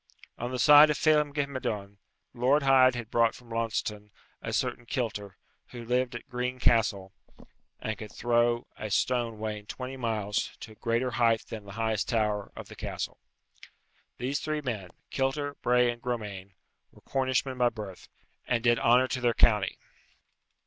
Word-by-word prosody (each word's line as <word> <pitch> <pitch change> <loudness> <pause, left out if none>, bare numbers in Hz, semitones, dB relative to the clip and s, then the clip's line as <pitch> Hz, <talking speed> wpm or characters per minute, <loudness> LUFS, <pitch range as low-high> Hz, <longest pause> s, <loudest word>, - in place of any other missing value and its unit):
On 120 - -3
the 130 - -3
side 150 +5 +8
of 150 - +1
Phelem 150 -2 +3
ghe 145 0 0
Madone, 105 -7 -4 0.4
Lord 130 +4 +2
Hyde 130 -2 +6
had 120 -2 -6
brought 115 -1 +3
from 120 -2 -15
Launceston 110 -2 -2 0.3
a - - -4
certain 120 - -2
Kilter, 105 -7 -3 0.3
who 120 -2 -9
lived 125 +1 0
at - - -8
Green 125 +1 -3
Castle, 105 -6 +2 0.7
and 110 - -3
could 105 0 -9
throw 120 0 +1
a 110 - -5
stone 120 +1 0
weighing 105 -1 -5
twenty 130 +1 -6
pounds 110 -4 -2
to 110 - -8
a - - -12
greater 120 +3 -1
height 115 -2 +2
than 110 -2 -7
the 100 - -10
highest 110 -2 0
tower 105 -3 0
of - - -8
the - - -11
castle. - - -5 1.0
These 130 +4 -1
three 155 -1 -2
men, 110 -9 -4 0.2
Kilter, 140 +2 -1
Bray, 125 0 +3
and 120 0 -10
Gromane, 105 -6 -5 0.4
were - - -20
Cornishmen 130 -1 -1
by 120 -1 +4
birth, 105 -5 -9 0.4
and 120 -2 0
did 120 -1 +4
honour 125 +2 +4
to 130 - -2
their 120 -2 +2
county. 105 -4 +3
120 Hz, 165 wpm, -29 LUFS, 110-130 Hz, 1.0 s, side